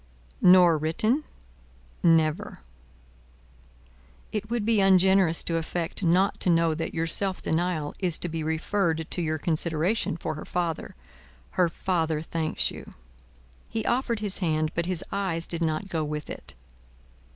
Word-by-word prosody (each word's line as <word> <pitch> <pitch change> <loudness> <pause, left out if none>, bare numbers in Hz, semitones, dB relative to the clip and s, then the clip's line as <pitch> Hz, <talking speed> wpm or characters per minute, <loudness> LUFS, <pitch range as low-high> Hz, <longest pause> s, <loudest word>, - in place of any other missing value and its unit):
"Nor 180 -3 +6
written?" 215 - 0 0.8
"Never." 160 -2 +2 1.7
"It 210 0 -4
would 235 -3 -1
be 225 -1 +3
ungenerous 190 -2 +4
to 165 - -1
affect 165 +2 -3
not 180 +2 +2
to - - 0
know 165 -1 +3
that 165 +1 -4
your 165 0 0
self 190 +3 0
denial 160 -2 -1
is 180 -4 0
to - - -3
be 165 -1 -4
referred 160 +1 -1
to 180 - 0
your 155 -1 -1
consideration 165 +4 0
for - - -3
her 155 - -7
father. 170 -3 -3 0.6
Her 180 -2 +2
father 160 -3 -1
thanks 160 -1 -1
you." - - -10 0.8
He 225 -1 -3
offered 240 -3 0
his 205 -2 +2
hand; 155 -3 0
but 170 0 -1
his 180 -3 -1
eyes 185 -4 -1
did 170 0 -4
not 160 +4 -1
go 165 -4 -2
with 150 0 -4
it. - - -7
170 Hz, 145 wpm, -26 LUFS, 160-190 Hz, 1.7 s, Nor